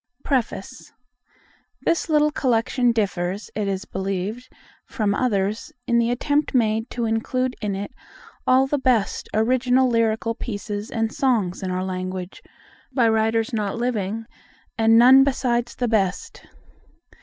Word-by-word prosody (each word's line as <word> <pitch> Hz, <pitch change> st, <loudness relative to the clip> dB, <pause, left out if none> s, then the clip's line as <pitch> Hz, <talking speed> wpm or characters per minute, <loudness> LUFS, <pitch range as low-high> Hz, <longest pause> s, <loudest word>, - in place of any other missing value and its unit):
Preface 255 Hz, -3 st, -3 dB, 0.9 s
THIS 335 Hz, 0 st, 0 dB
little 300 Hz, -1 st, +3 dB
Collection 245 Hz, -2 st, +1 dB
differs, 195 Hz, -3 st, -2 dB
it 210 Hz, -2 st, -2 dB
is 195 Hz, 0 st, -2 dB
believed, 195 Hz, +6 st, -4 dB, 0.4 s
from 215 Hz, -6 st, -1 dB
others 215 Hz, +4 st, -1 dB
in 235 Hz, 0 st, +2 dB
the 235 Hz, 0 st, +2 dB
attempt 285 Hz, +4 st, 0 dB
made 225 Hz, -1 st, +1 dB
to 240 Hz, -1 st, -3 dB
include 250 Hz, +3 st, -1 dB
in 205 Hz, -2 st, -2 dB
it 200 Hz, +1 st, -5 dB, 0.6 s
all 260 Hz, +1 st, +5 dB
the 285 Hz, +1 st, -1 dB
best 250 Hz, -6 st, 0 dB
original 255 Hz, +3 st, +2 dB
lyrical 230 Hz, -1 st, +1 dB
pieces 205 Hz, -2 st, -5 dB
and 225 Hz, 0 st, -2 dB
songs 220 Hz, -9 st, 0 dB
in 190 Hz, -, -3 dB
our 185 Hz, 0 st, -2 dB
language, 185 Hz, 0 st, -5 dB, 0.5 s
by 240 Hz, -4 st, +3 dB
writers 225 Hz, +1 st, +1 dB
not 210 Hz, -1 st, -2 dB
living, 225 Hz, -2 st, -2 dB, 0.5 s
and 225 Hz, 0 st, +4 dB
none 260 Hz, +3 st, +8 dB
besides 245 Hz, -3 st, 0 dB
the 245 Hz, -, -1 dB
best. 200 Hz, -5 st, -1 dB
225 Hz, 130 wpm, -23 LUFS, 205-255 Hz, 0.9 s, none